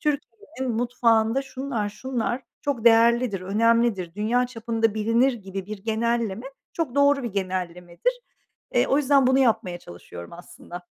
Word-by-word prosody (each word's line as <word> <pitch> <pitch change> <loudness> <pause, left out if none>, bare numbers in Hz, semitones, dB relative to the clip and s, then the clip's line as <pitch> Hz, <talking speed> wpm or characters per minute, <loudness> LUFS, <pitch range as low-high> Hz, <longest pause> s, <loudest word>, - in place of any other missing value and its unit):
Türkiye'nin 270 -2 -3
mutfağında 235 +1 +2
şunlar 265 -5 -4
şunlar 245 +2 -3 0.2
çok 275 -6 -2
değerlidir, 235 -2 +4
önemlidir, 210 -2 +1
dünya 235 +4 +1
çapında 225 -2 -1
bilinir 230 +5 +2
gibi 195 -4 -7
bir 215 -1 -6
genelleme 230 +1 -1 0.3
çok 315 -7 -3
doğru 280 0 +4
bir 235 -4 -4
genellemedir. 185 - -2 0.6
Eee, - - +3
o 270 - +2
yüzden 280 -2 +4
bunu 260 +1 +4
yapmaya 215 -9 +1
çalışıyorum 85 - -11
aslında. 175 0 -11
230 Hz, 130 wpm, -24 LUFS, 200-255 Hz, 0.6 s, değerlidir